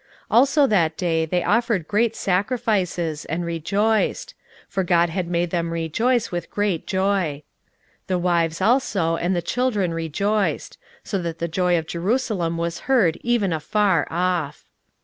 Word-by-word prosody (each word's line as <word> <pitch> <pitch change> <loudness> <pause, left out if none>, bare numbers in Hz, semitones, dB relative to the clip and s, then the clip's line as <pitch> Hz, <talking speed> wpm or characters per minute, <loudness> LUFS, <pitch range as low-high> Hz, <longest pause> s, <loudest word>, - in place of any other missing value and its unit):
16:012:043 - - +4
Also 280 +2 +4
that 170 -9 +1
day 165 -3 0
they 175 +2 0
offered 220 -7 +1
great 225 +2 +1
sacrifices, 185 -6 -1
and 170 +3 -3
rejoiced: 200 +7 0 0.3
for 190 - -1
God 175 -1 +3
had 180 0 -2
made 175 0 -1
them 170 -2 -1
rejoice 225 +9 0
with 175 -2 -4
great 205 -5 -1
joy: 190 -7 0 0.6
the 185 - 0
wives 170 -1 0
also 195 -7 +2
and 175 +3 0
the 175 - -1
children 210 -5 0
rejoiced: 195 +6 -1 0.2
so 195 -3 -2
that 165 -1 -4
the 170 - -2
joy 180 +1 +1
of 160 - -2
Jerusalem 180 -1 -1
was 170 0 -3
heard 205 -12 +3
even 230 -7 +1
afar 175 +1 +1
off. 170 -4 -1
180 Hz, 150 wpm, -22 LUFS, 165-210 Hz, 0.6 s, 16:012:043